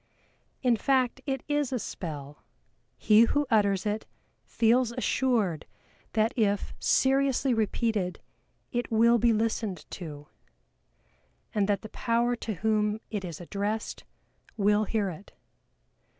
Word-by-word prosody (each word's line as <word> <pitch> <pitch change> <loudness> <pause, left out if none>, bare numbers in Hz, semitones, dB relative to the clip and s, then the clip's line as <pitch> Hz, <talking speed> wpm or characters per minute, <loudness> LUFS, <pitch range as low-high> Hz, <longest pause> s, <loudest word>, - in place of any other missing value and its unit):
In 245 -2 +4
fact 260 +1 +1
it 270 -2 -2
is 290 -3 0
a 255 - 0
spell, 150 - -7 0.5
he 215 +2 +6
who 290 +5 +1
utters 200 -3 +3
it 210 +1 -2 0.4
feels 235 +1 +2
assured 235 - 0 0.5
that 220 +3 +2
if 205 -4 0
seriously 270 -1 +2
repeated 220 -4 0 0.5
it 240 -1 -2
will 230 +1 +5
be 235 +1 +4
listened 220 -3 -1
to, 150 -5 -8 1.3
and 210 -2 +1
that 205 - +1
the 220 - -8
Power 235 +2 0
to 220 -2 -4
whom 215 +1 +1
it 205 -3 -3
is 170 -4 -6
addressed 205 +5 -3 0.5
will 210 +1 +3
hear 205 -3 -1
it. 180 +5 -12
220 Hz, 120 wpm, -28 LUFS, 200-240 Hz, 1.3 s, he